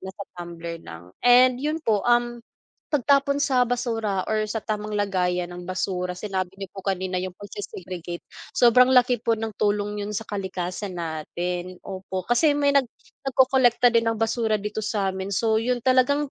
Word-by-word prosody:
nasa 190 Hz, +2 st, -8 dB, 0.2 s
tumbler 170 Hz, -1 st, -6 dB
lang. 85 Hz, +2 st, -11 dB
And 250 Hz, +1 st, +6 dB
'yun 305 Hz, +3 st, -1 dB
po, 210 Hz, -3 st, +2 dB
um, 240 Hz, 0 st, +2 dB, 0.5 s
pagtapon 280 Hz, 0 st, +3 dB
sa 255 Hz, -4 st, +3 dB
basura 225 Hz, -6 st, -1 dB
or 215 Hz, 0 st, +1 dB
sa 225 Hz, -, -2 dB
tamang 210 Hz, 0 st, -3 dB
lagayan 180 Hz, -3 st, 0 dB
ng 175 Hz, 0 st, -8 dB
basura 180 Hz, -1 st, -2 dB
sinabi 190 Hz, -1 st, -3 dB
niyo 195 Hz, -1 st, -7 dB
po 195 Hz, -, -8 dB
kanina 185 Hz, -1 st, -1 dB
yung 185 Hz, 0 st, -5 dB
pagse-segregate. 185 Hz, -4 st, -7 dB, 0.3 s
Sobrang 250 Hz, +1 st, +6 dB
laki 250 Hz, -2 st, +4 dB
po 230 Hz, 0 st, +2 dB
ng 220 Hz, 0 st, -4 dB
tulong 205 Hz, 0 st, 0 dB
'yun 205 Hz, +1 st, -4 dB
sa 225 Hz, -, -2 dB
kalikasan 190 Hz, -1 st, -4 dB
natin, 175 Hz, +2 st, -4 dB
opo. 190 Hz, -1 st, -5 dB
Kasi 285 Hz, +5 st, +3 dB
may 285 Hz, -1 st, +3 dB
nag 275 Hz, -2 st, +4 dB, 0.4 s
nagkolekta 255 Hz, -2 st, +4 dB
din 230 Hz, -1 st, +3 dB
ng 225 Hz, -, 0 dB
basura 225 Hz, -1 st, +1 dB
dito 210 Hz, +1 st, -5 dB
sa'min 195 Hz, -2 st, -2 dB
so, 220 Hz, +2 st, +2 dB
'yun 245 Hz, +1 st, 0 dB
talagang 270 Hz, +3 st, +3 dB
210 Hz, 160 wpm, -24 LUFS, 185-245 Hz, 0.5 s, And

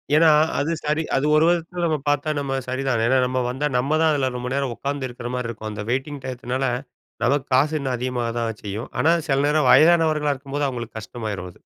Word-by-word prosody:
ஏன்னா 165 Hz, +1 st, +6 dB, 0.3 s
அது 150 Hz, +4 st, 0 dB
சரி, 155 Hz, +1 st, 0 dB
அது 135 Hz, -, +1 dB
ஒரு 155 Hz, +1 st, +5 dB
விதத்துல 175 Hz, +1 st, 0 dB
நம்ம 160 Hz, -2 st, +1 dB
பாத்தா 145 Hz, +1 st, 0 dB
நம்ம 135 Hz, -1 st, -2 dB
சரிதான். 130 Hz, -2 st, -1 dB
ஏன்னால 130 Hz, +2 st, +3 dB
நம்ம 130 Hz, 0 st, -1 dB
வந்தா, 140 Hz, +4 st, -1 dB
நம்ம 140 Hz, +5 st, +1 dB
தான் 160 Hz, -, +4 dB
அதில 135 Hz, -3 st, +1 dB
ரொம்ப 125 Hz, 0 st, -4 dB
நேரம் 135 Hz, -3 st, -1 dB
உக்காந்து 140 Hz, 0 st, -3 dB
இருக்கிற 120 Hz, 0 st, -7 dB
மாரி 125 Hz, -2 st, -2 dB
இருக்கும். 110 Hz, -1 st, -6 dB
அந்த 105 Hz, 0 st, -5 dB
வெயிட்டிங் 135 Hz, +2 st, -2 dB
டையத்துனால 130 Hz, +1 st, -3 dB, 0.6 s
நமக்கு 135 Hz, +3 st, +2 dB
காசு 150 Hz, +4 st, +3 dB
இன்னும் 130 Hz, -2 st, -2 dB
அதிகமாக 120 Hz, -1 st, -2 dB
தான் 115 Hz, -2 st, -3 dB
செய்யும் 105 Hz, +3 st, -5 dB
ஆனா 160 Hz, -, +4 dB, 0.2 s
சில 135 Hz, -2 st, +2 dB
நேரம் 150 Hz, -2 st, +2 dB
வயதானவர்களா 155 Hz, -2 st, +5 dB
இருக்கும்போது 140 Hz, +1 st, -3 dB
அவங்களுக்கு 120 Hz, -3 st, -6 dB
கஷ்டமாயிரும் 105 Hz, -5 st, -5 dB
அது. -, -, -17 dB
135 Hz, 200 wpm, -22 LUFS, 125-150 Hz, 0.6 s, ஏன்னா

